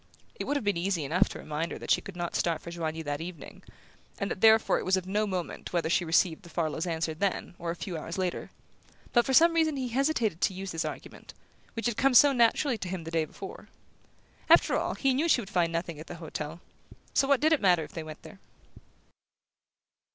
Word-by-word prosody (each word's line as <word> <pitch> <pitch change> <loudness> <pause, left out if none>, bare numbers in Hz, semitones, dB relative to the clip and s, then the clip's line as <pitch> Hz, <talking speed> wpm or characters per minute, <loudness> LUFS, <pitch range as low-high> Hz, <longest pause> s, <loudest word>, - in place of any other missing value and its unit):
It 470 - -5
would 290 +1 0
have 285 - -4
been 205 -3 0
easy 175 -2 -1
enough 165 +6 +2
to - - -7
remind 155 +2 -4
her - - -5
that - - -4
she - - +4
could 195 - -10
not 175 -1 -4
start 165 -2 0
for 170 - -9
Joigny 160 -1 -4
that 145 0 -3
evening, 170 -3 -9 0.6
and 200 - -3
that - - -5
therefore 220 0 +5
it - - -5
was 190 +1 +2
of 185 - -4
no 210 +3 0
moment 185 -3 -5
whether 170 -2 0
she 175 - +2
received 165 +1 +2
the 175 - -14
Farlows' 165 0 -2
answer 160 -1 -1
then 190 +3 -2
or 170 -1 -4
a 170 - -2
few 175 0 -6
hours 165 +3 -5
later; 185 -2 -2 0.6
but 240 -1 +4
for 265 - 0
some 335 +5 +6
reason 320 -3 +2
he 255 -2 -2
hesitated 240 - 0
to 190 - +1
use 190 0 -5
this 165 0 -2
argument, - - -8 0.4
which 225 - -4
had 240 -3 0
come 270 -1 +3
so 285 +3 +8
naturally 240 +1 +2
to 185 - -5
him 180 -2 -4
the 165 - -7
day 165 -1 +1
before. - - -10 0.8
After - - +6
all, - - -1
he 270 -1 +1
knew 305 +6 +1
she 260 - +5
would 210 -3 -7
find 175 -4 +1
nothing 165 -2 -3
at 155 - -10
the - - -7
hotel 160 0 -6 0.5
so 270 - +3
what 280 -2 +4
did 315 +1 +3
it 310 - +1
matter 180 -5 +4
if - - -10
they 165 - -5
went 155 0 -10
there? 200 - -13
180 Hz, 230 wpm, -28 LUFS, 165-230 Hz, 0.8 s, so